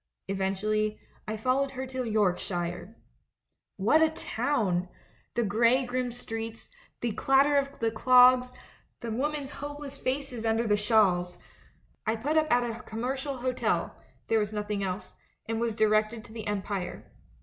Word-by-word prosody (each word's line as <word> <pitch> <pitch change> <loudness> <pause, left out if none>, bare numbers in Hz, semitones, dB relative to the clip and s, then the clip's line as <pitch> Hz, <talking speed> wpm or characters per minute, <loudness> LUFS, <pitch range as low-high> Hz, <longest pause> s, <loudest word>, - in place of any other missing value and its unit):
Eventually, 210 +2 0 0.3
I 215 0 -2
followed 260 +5 +1
her 260 - -2
to 255 -1 -4
Yorkshire. 180 -1 -1 0.8
"What 230 +11 +4
a 320 - +5
town! 205 - -1 0.5
The 240 - +2
grey 230 +5 +3
grim 250 0 -2
streets, 225 -1 -6 0.3
the 240 - 0
clatter 270 +6 +3
of 280 0 0
the 225 -1 0
clogs, 250 +2 +6 0.5
the 235 -1 -4
women's 285 +3 -2
hopeless 290 -1 -6
faces 260 -3 -2
under 225 +1 +1
the 210 -2 +3
shawls! 200 -5 +2 0.7
I 220 - +2
put 280 +8 -1
up 310 -1 +3
at 245 0 +4
a 230 +1 -5
commercial 260 +5 -3
hotel 255 0 -1 0.2
— - - -36
there 225 - +3
was 210 0 -1
nothing 210 -1 -2
else 190 +1 -4 0.2
— - - -45
and 225 0 -1
was 230 -2 0
directed 215 0 +2
to 220 - -14
the 220 -2 -6
Empire. 195 -3 -4
225 Hz, 150 wpm, -28 LUFS, 210-255 Hz, 0.8 s, clogs